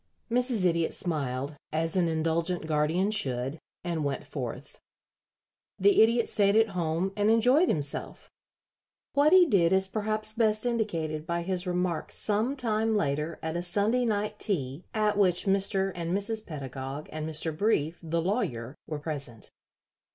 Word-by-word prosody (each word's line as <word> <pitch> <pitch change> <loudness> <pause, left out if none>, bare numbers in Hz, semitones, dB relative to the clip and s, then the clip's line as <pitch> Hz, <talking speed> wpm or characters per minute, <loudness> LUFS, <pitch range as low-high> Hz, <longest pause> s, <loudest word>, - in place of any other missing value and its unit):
Mrs. 245 -5 +2
Idiot 170 -2 +1
smiled, 140 -4 -2 0.2
as 165 +2 0
an 180 -2 +2
indulgent 165 +2 0
guardian 160 +6 +1
should, 135 - +1 0.2
and 170 -3 -2
went 140 -1 -2
forth. - - -7 1.0
The 405 -2 +5
Idiot 230 +1 +4
stayed 200 0 +3
at 225 0 +4
home 175 +1 -1
and 205 +1 +2
enjoyed 250 +10 +4
himself. 145 -2 -3 0.9
What 285 +2 +4
he 370 -1 +8
did 185 - +3
is 190 0 +3
perhaps 215 +1 -2
best 215 -1 +2
indicated 165 -10 -2
by 170 0 -1
his 185 0 -3
remarks 180 -2 -1
some 220 +6 +1
time 225 -3 0
later 150 -2 -1
at 160 +1 -3
a 175 - -1
Sunday 205 +8 +1
night 210 -2 -1
tea 145 -6 -1
at 210 -1 +1
which 180 -3 +3
Mr. 195 0 +1
and 170 +2 -2
Mrs. 215 +2 -2
Pedagog, 135 -1 -6
and 155 0 -4
Mr. 160 0 -1
Brief, 170 -4 0
the 165 0 -2
lawyer, 135 - -2
were 155 - -4
present. 140 -7 -6
180 Hz, 150 wpm, -28 LUFS, 155-215 Hz, 1.0 s, he